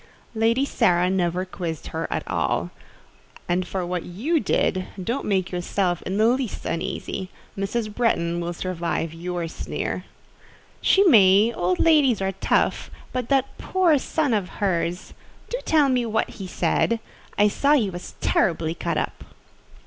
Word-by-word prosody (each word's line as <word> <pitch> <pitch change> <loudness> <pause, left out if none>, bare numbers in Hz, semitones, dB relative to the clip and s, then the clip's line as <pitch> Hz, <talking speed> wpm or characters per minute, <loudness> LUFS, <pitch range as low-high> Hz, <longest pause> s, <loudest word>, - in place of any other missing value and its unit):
"Lady 230 +4 +2
Sara 180 -8 +2
never 180 -1 0
quizzed 175 -4 -5
her 165 +1 -3
at - - -3
all; 85 +4 -1 0.8
and 180 +1 0
for 185 -1 -3
what 180 0 -2
you 255 - -1
did, 185 -4 0 0.2
don't 240 +9 -2
make 190 -3 0
yourself 180 0 -1
in 190 - -2
the 215 - +4
least 245 -1 0
uneasy: 180 +2 -3 0.3
Mrs. 210 +2 -2
Bretton 175 -8 +1
will 170 0 -3
survive 170 -2 -3
your 175 0 -4
sneer." 160 - -4 0.8
"She 390 - +5
may: 215 - +6
old 180 +1 0
ladies 290 -8 +4
are 190 0 0
tough; 195 - 0 0.2
but 250 -2 -3
that 275 -1 +1
poor 350 -6 +2
son 290 -2 0
of 200 -4 0
hers! 180 -2 -1 0.4
Do - - -1
tell 305 -3 +4
me 250 -3 +1
what 220 0 0
he 195 - -7
said: 230 +5 +1 0.4
I 205 - +5
saw 280 +8 +2
he 225 -10 +2
was 175 0 -8
terribly 160 -2 +1
cut - - -2
up." - - -3
195 Hz, 150 wpm, -24 LUFS, 175-240 Hz, 0.8 s, may